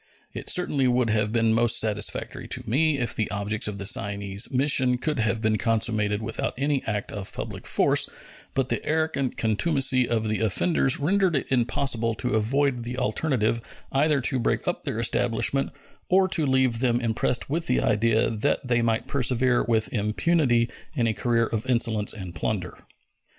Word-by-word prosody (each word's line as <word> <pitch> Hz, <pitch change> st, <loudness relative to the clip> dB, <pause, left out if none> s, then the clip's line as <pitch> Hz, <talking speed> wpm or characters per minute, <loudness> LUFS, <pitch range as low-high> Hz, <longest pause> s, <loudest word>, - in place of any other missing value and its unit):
It -, -, -5 dB
certainly 145 Hz, -7 st, +2 dB
would 125 Hz, -2 st, +2 dB
have 105 Hz, -1 st, +1 dB
been 115 Hz, -1 st, +2 dB
most 120 Hz, +1 st, +4 dB
satisfactory 105 Hz, -2 st, -1 dB
to -, -, -4 dB
me 145 Hz, +6 st, +2 dB
if 120 Hz, -3 st, -1 dB
the 110 Hz, -, -1 dB
objects 105 Hz, +1 st, -2 dB
of 105 Hz, -1 st, -4 dB
the 100 Hz, -, -6 dB
Cyane's 100 Hz, 0 st, 0 dB
mission 130 Hz, -1 st, +2 dB
could 150 Hz, +2 st, -2 dB
have 110 Hz, 0 st, 0 dB
been 110 Hz, -1 st, +1 dB
consummated 110 Hz, -2 st, 0 dB
without 115 Hz, 0 st, -3 dB
any 140 Hz, 0 st, 0 dB
act 105 Hz, -2 st, -3 dB
of 100 Hz, -1 st, -4 dB
public -, -, -7 dB
force, -, -, +3 dB, 0.5 s
but 135 Hz, -1 st, 0 dB
the -, -, -2 dB
arrogant 155 Hz, -4 st, -1 dB
contumacy 130 Hz, +2 st, +2 dB
of 110 Hz, -2 st, 0 dB
the 110 Hz, 0 st, -1 dB
offenders 130 Hz, -, +1 dB
rendered 185 Hz, +3 st, +1 dB
it 135 Hz, -, -2 dB
impossible 115 Hz, -2 st, +1 dB
to 125 Hz, +3 st, -3 dB
avoid 125 Hz, +3 st, +1 dB
the 120 Hz, +2 st, -5 dB
alternative 115 Hz, -2 st, 0 dB, 0.3 s
either 145 Hz, +1 st, +2 dB
to 130 Hz, +1 st, 0 dB
break 115 Hz, -, -1 dB
up -, -, -2 dB
their -, -, -3 dB
establishment 120 Hz, +3 st, +1 dB, 0.4 s
or 190 Hz, +1 st, +4 dB
to 160 Hz, -5 st, 0 dB
leave 130 Hz, -3 st, +2 dB
them 120 Hz, -1 st, +1 dB
impressed 115 Hz, +1 st, -1 dB
with 165 Hz, +4 st, -2 dB
the 125 Hz, -, +2 dB
idea 115 Hz, -1 st, +1 dB
that 115 Hz, +4 st, -1 dB
they 120 Hz, -1 st, +2 dB
might 115 Hz, 0 st, 0 dB
persevere 125 Hz, -2 st, +1 dB
with 110 Hz, -2 st, 0 dB
impunity 120 Hz, +3 st, +1 dB, 0.3 s
in 120 Hz, -5 st, +1 dB
a 115 Hz, -, +1 dB
career 115 Hz, 0 st, +1 dB
of 110 Hz, +2 st, -4 dB
insolence 115 Hz, -4 st, +1 dB
and 95 Hz, -5 st, -8 dB
plunder. 90 Hz, +2 st, -3 dB
120 Hz, 170 wpm, -25 LUFS, 110-135 Hz, 0.5 s, most